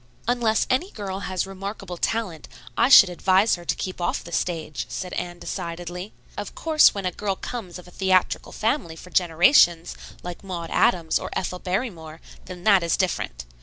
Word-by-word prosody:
"Unless 235 -3 +2
any 325 +9 0
girl 195 - -5
has 185 0 -1
remarkable 195 -1 -7
talent, 185 -4 -2 0.3
I - - +3
should 205 -7 +10
advise 190 +4 +3
her 175 - -2
to - - 0
keep 185 -1 -5
off 175 - -1
the 170 - -11
stage," 160 -7 -3
said 180 -1 -5
Anne 175 0 -4
decidedly. 175 +3 -6 0.2
"Of 205 - -6
course 315 -7 +4
when 200 -2 -4
a 180 - 0
girl 200 +1 -2
comes 190 -5 -6
of 180 - -13
a - - -14
theatrical 185 0 +1
family 220 - -1
for 180 +3 -13
generations, 175 - +4 0.3
like 175 +1 -7
Maud 175 -4 -6
Adams 165 -3 +2
or - - -6
Ethel 180 0 -3
Barrymore, 180 -6 -4 0.3
then 180 -1 -9
that 200 -2 +5
is 170 -1 0
different. 60 - -2
185 Hz, 175 wpm, -24 LUFS, 175-200 Hz, 0.3 s, should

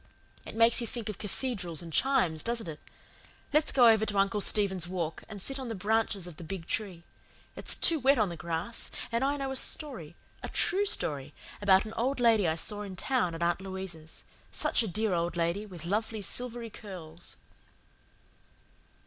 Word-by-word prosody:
"It - - -8
makes 230 +2 +5
you 235 - -2
think 230 -2 -5
of 210 - -6
cathedrals 200 - -4
and 165 -1 -9
chimes, 235 - +2
doesn't 230 -3 -2
it? 155 -2 -7 0.7
Let's 305 +1 +3
go 245 -3 +6
over 220 -1 +5
to 205 - -1
Uncle 195 +1 +2
Stephen's 190 -4 +5
Walk, 170 -3 -4
and 210 -2 -8
sit 270 +8 -2
on 260 - -5
the 225 - -4
branches 205 -1 0
of 175 -4 -10
the - - -9
big 165 +1 -6
tree. 185 -5 -4 0.5
It's - - 0
too 330 -2 +4
wet 270 +1 +4
on 215 -4 +2
the 170 - -6
grass, 170 +6 -4 0.2
and 235 +2 0
I 285 +1 +1
know 270 -1 -3
a - - -4
story 240 - +2 0.3
a - - -6
TRUE 400 +3 +1
story, 145 - +1 0.3
about 195 -1 +4
an 215 - -8
old 260 +3 -1
lady 225 -6 +4
I 160 - +1
saw 205 +5 -2
in 195 -2 -7
town 185 -5 0
at 165 - -3
Aunt 175 +2 0
Louisa's. 190 -4 -8 0.3
Such - - +1
a 225 - -1
dear 210 +1 -1
old 170 0 -1
lady, 170 +5 -1
with 175 -5 -10
lovely 215 +3 -2
silvery 240 0 -1
curls." 175 -5 -10
205 Hz, 190 wpm, -29 LUFS, 170-235 Hz, 0.7 s, go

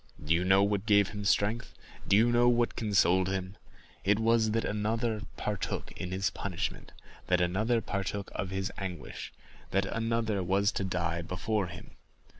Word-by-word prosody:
Do 75 +2 +2
you 85 +2 +2
know 95 +1 +5
what 100 +1 0
gave 100 -2 +5
him 105 0 -6
strength? 105 +4 +1 0.3
do 100 - +5
you 120 +2 +4
know 120 0 +5
what 120 -1 +2
consoled 95 -4 +3
him? 95 0 -3 0.5
It 100 +1 +3
was, 115 0 +3
that 115 +1 0
another 110 +1 -1 0.2
partook 105 -2 -3
of 90 - -3
his 95 +2 0
punishment—that 90 -1 -4
another 105 +7 +1
partook 100 -1 -3
of 90 0 -3
his 95 +1 -2
anguish—that 95 +1 -5
another 115 -1 -1
was 100 +3 +2
to - - -2
die 85 -2 -1
before 95 +3 -1
him! 85 0 -10
100 Hz, 155 wpm, -30 LUFS, 95-110 Hz, 0.5 s, know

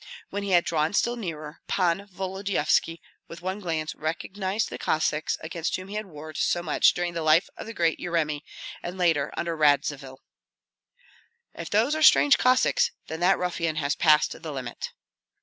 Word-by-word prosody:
When 205 - -3
he 200 - -4
had 175 -2 +4
drawn 155 +2 0
still 240 +2 +1
nearer, 160 -8 -7
Pan 185 +1 0
Volodyovski 190 -4 -1 0.3
with 170 +1 -11
one 190 +2 -3
glance 160 -5 -3
recognized 190 +6 -3
the - - -6
Cossacks 155 0 0
against 165 +1 -3
whom 185 +1 -7
he - - -7
had 215 -1 -3
warred 155 -2 -9
so 175 - +1
much - - +3
during 175 0 -2
the 170 - -3
life 155 +3 +4
of - - -8
the 225 - -6
great 165 -2 +1
Yeremi, 155 -4 -1 0.4
and 175 +2 -6
later 165 -6 +2
under 170 -1 -2
Radzivill. 145 -3 +1 1.4
"If - - -7
those 225 +8 +2
are 315 - -1
strange 290 -2 +6
Cossacks, 260 - +3 0.2
then 160 - -5
that 180 +3 +4
ruffian 170 -3 -2
has 145 -2 0
passed 155 -1 +3
the 160 -2 -6
limit." 130 -4 -5
170 Hz, 170 wpm, -26 LUFS, 155-190 Hz, 1.4 s, strange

